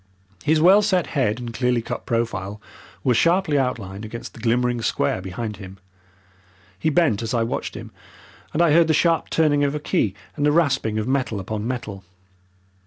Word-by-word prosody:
His 155 - +2
well 190 +6 +6
set 190 -4 +1
head 125 -6 +1
and 120 -1 -6
clearly 125 -1 0
cut - - -6
profile 105 -4 -2 0.4
were 125 - +3
sharply 170 +2 +2
outlined 105 -6 -3
against 115 +2 -7
the - - -13
glimmering 120 +1 +1
square 95 -5 0
behind 105 +3 -5
him. 95 -1 -10 1.0
He 160 - +1
bent 150 - +2
as 115 +1 -2
I 115 - +2
watched 115 - -3
him, - - -8 0.6
and 165 - +2
I 170 - +4
heard 165 +1 +5
the 160 - +3
sharp 165 +1 +2
turning 145 -3 +2
of 140 +1 0
a - - -2
key 130 - 0 0.2
and 145 - -2
the 145 - +4
rasping 135 -9 +1
of 110 +1 -2
metal 130 -5 0
upon 105 +3 -4
metal. 110 -6 -5
125 Hz, 180 wpm, -22 LUFS, 110-150 Hz, 1.0 s, well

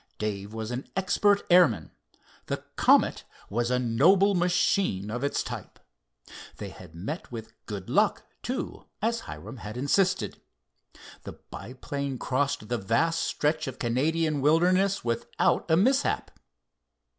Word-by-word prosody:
Dave 105 -1 -3
was 110 +1 -5
an 125 +2 -5
expert 200 +2 +2
airman. 175 -1 +5 0.6
The - - -3
Comet - - +4 0.3
was 120 +3 0
a 125 - +2
noble 170 - +4
machine 175 - +1
of 120 +3 -3
its 140 - 0
type. - - -7 0.8
They 100 - -6
had 90 -3 -13
met 125 - -6
with 115 -2 -7
"good 100 -4 -6
luck," - - +2 0.2
too, - - -4 0.2
Hiram 225 - -3
had 110 +1 -7
insisted. 145 - +1 0.8
The - - -8
biplane 135 +4 -6
crossed 135 -1 -1
the 120 +1 -1
vast 165 +12 +1
stretch 155 +1 0
of 130 - -5
Canadian 150 +5 0
wilderness 180 +6 +3
without 115 +7 0
a 160 - +5
mishap. 265 +9 +2
140 Hz, 125 wpm, -27 LUFS, 115-175 Hz, 0.8 s, airman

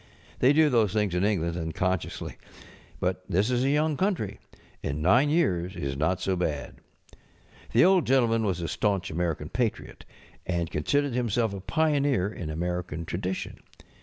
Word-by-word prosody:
They 130 - +5
do 150 0 +4
those 110 -5 +3
things 105 -4 +1
in 90 +1 +1
England 85 -5 0
un┬¼ 80 -2 -4
consciously. 90 -2 -2 0.6
But 90 0 -1
this 100 +6 +2
is 125 0 +1
a 135 - +2
young 150 +1 +1
country, 175 - -1 0.4
and 70 +2 -3
nine 120 - +4
years 95 - +1
is 70 -1 -3
not 80 +6 0
so 95 0 0
bad. 75 -6 -3 0.9
The - - +5
Old 185 -2 +4
Gentleman 115 -4 +3
was 95 -5 -1
a 85 - -2
staunch 100 +2 -1
American 80 -2 -2
patriot, 120 -4 -3 0.4
and 85 -2 -2
considered 145 - 0
himself 115 -3 0
a 100 - -5
pioneer 145 - +1
in 80 - -6
American 90 +1 -3
tradition. 95 +3 -4
95 Hz, 160 wpm, -27 LUFS, 85-125 Hz, 0.9 s, They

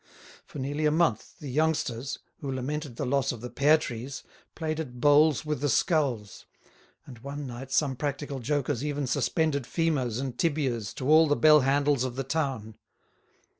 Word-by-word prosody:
For - - -10
nearly 145 +3 -1
a - - +3
month 155 -9 0
the 145 -3 -7
youngsters, 140 -4 -1 0.2
who 140 - -4
lamented 135 +1 -4
the - - -3
loss 135 +1 +1
of 120 -4 -8
the 125 - -7
pear 150 +3 +4
trees, 130 0 -6 0.3
played 155 -1 -3
at 125 -6 -6
bowls 150 +2 +4
with 150 -3 -2
the 145 - +1
skulls; 130 - 0 0.6
and 125 -4 -12
one 140 +3 -6
night 130 +1 -8
some 135 0 +1
practical 140 0 -4
jokers 140 0 -1
even 145 -1 -2
suspended 140 +2 0
femurs 135 -8 -1
and 130 -3 -5
tibias 135 -10 -1
to 130 - -4
all 155 +2 +6
the 145 - +2
bell 155 0 +6
handles 140 0 +2
of 130 -2 -3
the 135 - -2
town. 135 -7 -3
140 Hz, 170 wpm, -27 LUFS, 125-150 Hz, 0.6 s, all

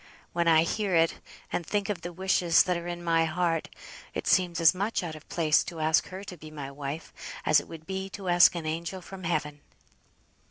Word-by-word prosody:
When 170 0 +1
I 160 -1 +6
hear 195 +2 -1
it, 165 0 +3 0.3
and - - 0
think 205 +3 -1
of 200 -5 -3
the 175 - -5
wishes 180 -1 +3
that 180 - 0
are 170 0 -5
in 175 0 -5
my 165 -1 +3
heart, 165 0 -1 0.5
it - - -3
seems 175 -2 +2
as 165 +1 +6
much 200 +2 -1
out 165 -2 -4
of 155 - -14
place 155 -3 +3
to 170 -2 -7
ask 155 +1 +2
her 190 +1 -8
to 185 -3 -9
be 155 0 -11
my 145 -3 -7
wife, 145 +3 -6 0.3
as 155 -1 +5
it - - -10
would 160 -1 -10
be 190 +1 -4
to 195 -2 -8
ask 175 0 +6
an 170 -2 -4
angel 170 +4 -3
from 185 0 -9
heaven." 150 -3 -2
170 Hz, 215 wpm, -28 LUFS, 160-185 Hz, 0.5 s, I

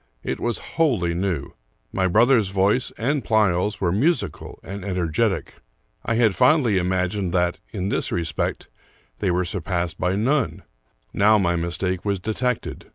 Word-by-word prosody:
It - - -3
was 120 -1 -1 0.2
wholly 105 - +2
new. 85 -5 -2 0.4
My 95 -1 +1
brother's 115 +3 +4
voice 100 +6 +2
and 140 +4 0
Pleyel's 105 -2 +1
were 90 -3 +1
musical 105 - -1
and 100 0 -7
energetic. 90 -5 -1 0.5
I 115 - 0
had 115 -3 +3
fondly 125 - +3
imagined 90 +1 -1
that, 90 0 +1
in 95 -3 -3
this - - -1
respect, 80 -3 -2 0.5
they - - 0
were 90 +1 +1
sur 85 +2 -2
passed 85 -1 -2
by 90 +1 +1
none. 125 +5 0 0.5
Now 105 +2 +5
my 85 -4 +1
mistake 85 +2 -2
was 100 -2 -1
detected. 115 +5 -3
95 Hz, 150 wpm, -23 LUFS, 90-110 Hz, 0.5 s, Now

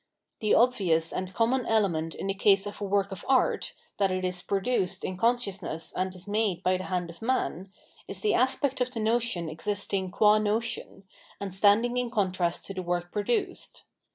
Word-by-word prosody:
The 215 - +3
obvious 185 -10 +3
and 185 0 -3
common 235 +6 +1
element 170 -8 +1
in - - -5
the 195 - 0
case 195 0 +3
of 205 0 -7
a - - -1
work 200 0 +1
of 190 - -7
art, 265 -1 +2 0.2
that 195 -1 +3
it 185 0 -1
is 180 -1 -3
produced 195 -2 -1
in 185 - -3
consciousness 195 -6 -1
and 185 0 -1
is 185 +2 -10
made 205 -4 0
by 185 0 +2
the 185 - -6
hand 180 -2 -2
of 170 - -16
man, 210 -6 -1 0.4
is - - -5
the 425 - +2
aspect 260 +1 +1
of 250 - +1
the 235 - -5
notion 220 -5 0
ftvisting 190 +3 -2
qm 210 +3 +4
notion, 220 -1 -2 0.4
and 200 -2 -5
standing 215 +5 +3
in 250 -1 0
contrast 185 -5 0
to 195 - -6
the 190 - -4
work 175 0 -2
produced. 210 +3 -2
200 Hz, 185 wpm, -28 LUFS, 185-225 Hz, 0.4 s, qm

